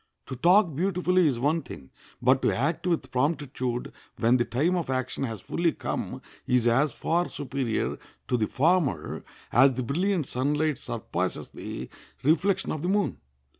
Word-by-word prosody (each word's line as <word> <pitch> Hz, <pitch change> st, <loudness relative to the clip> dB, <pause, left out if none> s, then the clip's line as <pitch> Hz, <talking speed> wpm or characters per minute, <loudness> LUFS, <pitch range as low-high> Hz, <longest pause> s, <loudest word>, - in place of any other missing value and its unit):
To 130 Hz, -, -6 dB
talk 175 Hz, -, +4 dB
beautifully 180 Hz, 0 st, +2 dB
is 130 Hz, -5 st, +1 dB
one 150 Hz, +7 st, +1 dB
thing, 65 Hz, -, -11 dB, 0.3 s
but -, -, +4 dB
to -, -, +3 dB
act 160 Hz, +7 st, -1 dB
with 160 Hz, -7 st, -1 dB
promptitude 130 Hz, -3 st, -1 dB, 0.2 s
when 120 Hz, +2 st, +4 dB
the 120 Hz, -, +1 dB
time 140 Hz, +10 st, +1 dB
of 170 Hz, -6 st, -2 dB
action 130 Hz, +1 st, -1 dB
has 110 Hz, -6 st, -5 dB
fully 170 Hz, -1 st, 0 dB
come -, -, -4 dB, 0.2 s
is 125 Hz, -2 st, +3 dB
as 130 Hz, +5 st, +3 dB
far 170 Hz, +8 st, 0 dB
superior 135 Hz, -4 st, -2 dB, 0.3 s
to -, -, +1 dB
the 110 Hz, -3 st, +1 dB
former 145 Hz, -, +1 dB, 0.3 s
as 135 Hz, +1 st, +5 dB
the 130 Hz, -, -2 dB
brilliant 175 Hz, -, 0 dB
sunlight 145 Hz, +4 st, 0 dB
surpasses -, -, -3 dB
the -, -, -6 dB, 0.4 s
reflection 185 Hz, +6 st, +2 dB
of 155 Hz, -, -3 dB
the 175 Hz, -, -1 dB
moon. 205 Hz, +1 st, +1 dB
145 Hz, 160 wpm, -27 LUFS, 125-170 Hz, 0.4 s, as